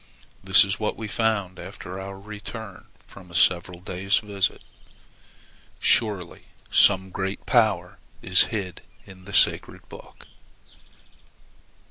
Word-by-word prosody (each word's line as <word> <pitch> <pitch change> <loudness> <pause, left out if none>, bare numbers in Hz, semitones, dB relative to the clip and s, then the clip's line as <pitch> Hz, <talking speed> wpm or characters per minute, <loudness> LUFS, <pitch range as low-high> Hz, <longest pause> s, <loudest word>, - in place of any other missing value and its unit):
This 95 +1 +7
is 100 0 -3
what 105 - -2
we 110 - -6
found 105 -4 -1
after 95 +1 -9
our 95 0 -8
return 105 0 -10 0.2
from 95 -2 -15
a 85 - -12
several 90 0 +2
days' 95 +2 -1
visit. 100 -3 -2 1.2
Surely 100 -7 +1 0.3
some 95 -1 +3
great 95 +1 -5
power 105 -8 +1 0.2
is 90 0 +5
hid 100 -5 -5 0.2
in 95 -1 -15
the 100 - -10
sacred - - +3
book!" - - -14
95 Hz, 115 wpm, -24 LUFS, 90-105 Hz, 1.2 s, This